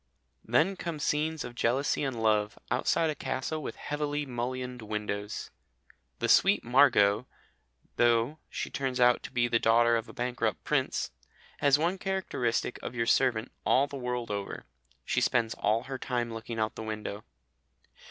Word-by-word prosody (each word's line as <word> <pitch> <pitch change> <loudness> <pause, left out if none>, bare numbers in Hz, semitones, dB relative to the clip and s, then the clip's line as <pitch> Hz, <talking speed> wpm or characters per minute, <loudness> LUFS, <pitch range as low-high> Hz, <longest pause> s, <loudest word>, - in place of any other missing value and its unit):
Then 155 - +2
come 170 -3 -4
scenes 150 +1 0
of 120 - -7
jealousy 125 +5 +1
and 125 -5 -2
love, 105 -1 +2
outside 160 -1 +2
a - - -2
castle 150 +2 -3
with - - -5
heavily 150 0 -2
mullioned 125 0 -4
windows. 105 -1 -4 0.7
The - - -1
sweet - - +5
Margot, 120 -3 +4 0.7
though 120 +5 +3
she - - -4
turns 130 -2 -2
out 125 0 +5
to - - -8
be 120 -1 +2
the 115 -1 +2
daughter 115 +1 +4
of 115 0 -2
a - - -10
bankrupt 125 0 -2
prince, - - 0 0.5
has 140 -1 +5
one 175 +5 0
characteristic 130 -13 -1
of - - -6
your 115 -1 0
servant 120 -2 +2
all 135 - +4
the 140 - -9
world 125 -3 -3
over 100 -1 -4 0.4
she - - +1
spends 115 -2 +2
all 110 +3 +1
her 135 0 -6
time 120 -3 -2
looking 115 +1 -6
out 110 0 0
of - - -40
the - - -5
window. 110 -1 -5
125 Hz, 160 wpm, -29 LUFS, 115-140 Hz, 0.7 s, sweet